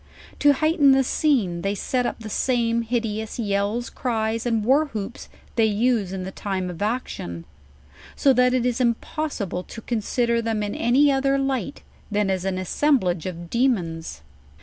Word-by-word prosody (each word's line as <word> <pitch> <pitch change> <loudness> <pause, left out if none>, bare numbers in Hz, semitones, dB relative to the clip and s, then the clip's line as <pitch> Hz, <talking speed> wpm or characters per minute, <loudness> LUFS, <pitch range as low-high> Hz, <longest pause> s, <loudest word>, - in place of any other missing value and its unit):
To 290 0 +6
hightcn 295 -1 +4
the 270 0 +4
scene, 235 - +1
they 195 +2 -1
set 250 +5 -1
up - - -5
the 220 - -7
same 235 -2 +1
hideous 225 -2 -2
yells, 210 +2 -1
cries, 225 -1 -1
and 225 -3 0
war 280 +6 +4
hoops 220 -3 -6 0.3
they 225 - +4
use 215 -2 +1
in 190 -1 -4
the 190 - -5
time 190 -2 -3
of 170 - -10
action: 205 - -3 0.7
so 275 - +4
that 250 0 +3
it 250 -1 +1
is 250 0 0
impossible 235 - -1
to - - -9
consider 235 +1 0
them 225 -2 -1
in 205 0 -3
any 270 +5 +3
other 275 0 +2
light 270 0 -2 0.3
than 205 -2 +1
as 190 -1 -2
an 190 -1 -1
assemblage 185 - +1
of 170 -1 -7
demons. 170 - -1
230 Hz, 165 wpm, -23 LUFS, 195-255 Hz, 0.7 s, To